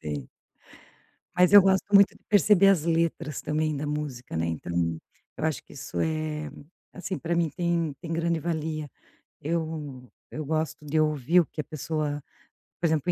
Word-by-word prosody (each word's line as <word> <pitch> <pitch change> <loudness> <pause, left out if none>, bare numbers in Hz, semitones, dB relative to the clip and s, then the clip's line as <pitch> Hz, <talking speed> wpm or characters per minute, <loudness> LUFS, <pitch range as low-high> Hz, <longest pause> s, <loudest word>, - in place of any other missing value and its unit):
tem. 75 -4 -5 1.1
Mas 180 +1 +5
eu 205 - +11
gosto 190 0 +3
muito 200 0 +7
de - - -27
perceber 205 -1 +5
as 180 -6 +4
letras 165 -2 0
também 155 0 0
da 145 +2 -3
música, 145 - -4
né, 80 +1 0
então, 85 0 -1 0.4
eu - - -4
acho 160 -2 0
que - - -18
isso 140 - -6
é, 155 -1 -2 0.4
assim, 185 0 -5
para 170 0 -2
mim 170 -2 +1
tem 170 -3 0
tem 165 -1 -5
grande 165 0 0
valia. 155 -2 -3 0.5
Eu, 150 -5 -4 0.2
eu 155 - -5
gosto 155 0 -2
de 155 +2 +1
ouvir 155 +2 +3
o 165 - 0
que 155 - -6
a - - -4
pessoa, 150 -1 -3 0.6
por 170 - +2
exemplo 160 +2 +1
155 Hz, 170 wpm, -27 LUFS, 150-170 Hz, 1.1 s, eu